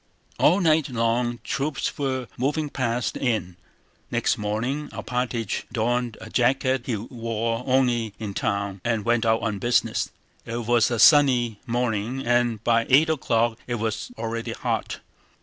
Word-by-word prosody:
All 180 +6 +4
night 155 -4 +3
long 120 0 0
troops 140 +1 -2
were 130 -3 -2
moving 145 +3 -1
past 120 -4 -1
the - - -7
inn. 110 -9 -1 0.5
Next - - +1
morning 115 +8 -2
Alpátych 125 -3 -3
donned 120 0 -1
a - - -9
jacket 130 0 +1
he 120 - 0
wore 115 +1 -3
only 120 -5 +1
in 105 -3 -5
town 100 -1 -2
and 115 -3 -1
went 120 -1 +2
out 110 0 +2
on 105 -3 -1
business. 120 +3 +1 0.3
It 115 0 -4
was 120 -1 +3
a 120 - -1
sunny 125 -6 +5
morning 120 +1 -1
and 120 -2 +1
by 115 -1 +2
eight 150 +5 +5
o'clock 120 -6 +1
it 120 - -1
was 110 -1 -3
already 115 0 -3
hot. - - -3
120 Hz, 150 wpm, -24 LUFS, 115-130 Hz, 0.5 s, sunny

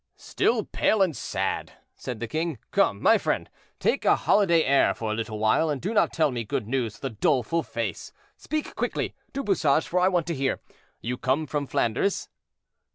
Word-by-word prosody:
"Still - - 0
pale 215 -3 +2
and 170 -6 0
sad," - - -3 0.2
said 125 -3 -6
the 120 - -3
king. 160 +2 -2
"Come, - - +1
friend, - - -1 0.3
take - - +1
a - - +5
holiday 170 -6 +3
air 140 +1 +3
for 110 -1 -3
a - - 0
little 110 -1 -4
while, 110 +9 +2
and 145 -3 -1
do 200 +9 -3
not 215 - +3
tell 155 -4 +2
me 120 -2 -3
good 105 0 -3
news 120 -4 -1
with - - -19
a 130 -5 -4
doleful 135 +8 +1
face: 115 - -4 0.2
speak 310 +1 -4
quickly, - - -2 0.2
Du 275 0 -3
Bouchage, 160 - +2
for 180 - +1
I 180 - +4
want 175 -4 +1
to 170 - -2
hear. 135 -3 -1 0.4
You 125 +2 -3
come 135 +4 +1
from 145 -1 -3
Flanders?" 120 - 0
140 Hz, 190 wpm, -26 LUFS, 115-170 Hz, 0.4 s, a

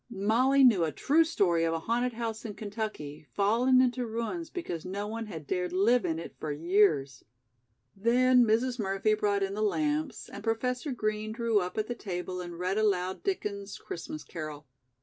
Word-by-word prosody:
Molly 240 +6 +3
knew 220 -9 +6
a 160 - 0
true 310 - +3
story 180 - +1
of 165 0 +1
a 165 - -3
haunted 240 +6 0
house 225 -1 -4
in 215 -3 -6
Kentucky, 205 -9 -5
fallen 235 +6 +4
into 250 -1 +1
ruins 235 +9 -3
because 325 - -5
no 195 +3 -4
one 225 +1 -5
had 160 -7 -7
dared 180 +3 -2
live 215 +7 +3
in 160 - -1
it 165 - -8
for 155 - -3
years. 155 -5 +2 0.7
Then 245 +4 +4
Mrs. 235 +3 +1
Murphy 195 +1 +1
brought 205 -2 +1
in 195 0 -2
the 210 - -3
lamps 295 +3 -1
and - - -9
Professor 250 +5 -1
Green 215 -2 -2
drew 230 -2 +2
up 180 +1 -4
at 215 - +1
the 240 - -3
table 180 -4 -5
and 175 -1 -7
read 185 +4 -1
aloud 190 -3 0
Dickens's 205 - -3
"Christmas 155 -2 -7
Carol." 155 -3 -7
210 Hz, 180 wpm, -29 LUFS, 180-240 Hz, 0.7 s, knew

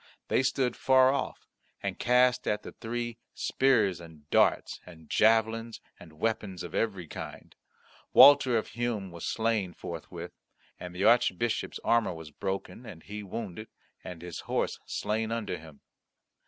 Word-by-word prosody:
They - - +3
stood 130 -2 0
far 130 0 +5
off, 140 - -4 0.4
and - - -3
cast 125 +1 +3
at 105 - 0
the - - -8
three 120 0 -5 0.2
spears 110 -10 +2
and 80 -3 -14
darts - - +2
and 80 -3 -14
javelins 115 +1 +2 0.2
and 80 -3 -14
weapons 105 -3 -2
of 90 - -8
every 100 -6 -1
kind. - - -9 0.6
Walter 140 -4 +8
of 110 - -3
Hum 115 -6 -2
was 85 -1 -7
slain 110 -5 0
forthwith; 85 -2 -7 0.5
and 90 0 -8
the 95 - -2
Archbishop's 115 -1 +2
armour 115 -6 +2
was 80 -2 -10
broken, 95 - -5
and 100 -9 -11
he 105 +1 -7
wounded, 105 +1 -6 0.4
and 85 -2 -8
his 90 -2 -6
horse - - -2
slain 110 +1 -2
under 110 -7 -3
him. 80 -3 -14
110 Hz, 145 wpm, -29 LUFS, 90-120 Hz, 0.6 s, Walter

